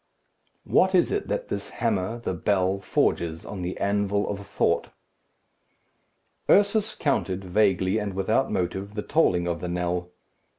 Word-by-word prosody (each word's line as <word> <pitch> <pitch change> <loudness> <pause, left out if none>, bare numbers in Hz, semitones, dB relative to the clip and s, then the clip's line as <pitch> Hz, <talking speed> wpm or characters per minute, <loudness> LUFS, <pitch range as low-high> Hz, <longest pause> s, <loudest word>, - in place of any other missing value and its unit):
What 190 +1 +3
is 180 - +3
it 415 - -1
that - - -3
this - - -4
hammer, 110 -1 -1
the 115 -5 -3
bell, 95 +1 +1
forges 85 -4 0
on 100 -3 -6
the 90 +1 -4
anvil 100 0 0
of 100 -1 -5
thought? - - +1 1.6
Ursus 205 +2 +3
counted, 95 -10 -1
vaguely 95 +1 +2
and 100 -3 -4
without 110 +7 +1
motive, 95 +3 -2
the 105 - -3
tolling 90 - +2
of 85 -1 -2
the 90 - -3
knell. 90 0 -2
100 Hz, 140 wpm, -25 LUFS, 90-110 Hz, 1.6 s, What